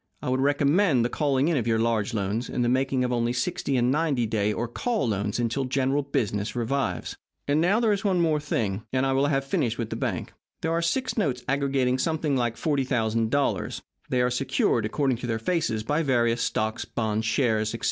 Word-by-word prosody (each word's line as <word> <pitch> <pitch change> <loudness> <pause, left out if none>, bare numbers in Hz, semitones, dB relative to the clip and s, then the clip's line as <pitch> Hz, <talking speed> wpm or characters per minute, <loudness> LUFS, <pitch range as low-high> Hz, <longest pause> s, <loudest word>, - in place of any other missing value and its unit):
I - - -4
would 130 +1 +1
recommend 145 - +3
the - - 0
calling 140 0 +1
in 165 -3 +2
of 120 -3 -1
your 115 -1 +2
large 115 0 0
loans, 105 +4 -2
and 120 - 0
the - - +2
making 130 0 +1
of 125 - -1
only 120 0 0
sixty 135 +1 -1
and 125 +1 +2
ninety 145 -5 +1
day 105 -1 0
or 115 +3 -2
call 220 - -1
loans 100 -1 -1
until 120 +3 0
general 135 +2 +1
business 105 -7 -2
revives. 120 -6 -2 0.3
And 145 +2 +2
now, 195 +6 +3
there 230 -2 +2
is 200 -2 0
one 195 -3 +2 0.2
thing 120 -8 -1
more, - - -18
and 130 +1 +1
I 135 - +1
will 135 +2 +2
have 135 -2 0
finished 120 -4 0
with 115 -2 -4
the - - -2
bank. - - -3 0.3
Here 160 - 0
are 165 +1 +1
six 245 +9 0
notes 130 -10 -1
aggregating 135 -2 +1
something 155 -2 0
like 120 -3 0
$40,000. 125 -3 0 0.3
They 125 -1 +2
are 125 - +1
secured, 125 -3 +1
according 135 +1 0
to 125 - -5
their 115 -1 0
faces, 115 -4 -1
by 150 +8 0
various 120 -5 +1
stocks, 110 -1 -1
bonds, 110 -1 -2
shares, 110 -3 +1
etc. - - -6
130 Hz, 210 wpm, -26 LUFS, 115-145 Hz, 0.3 s, recommend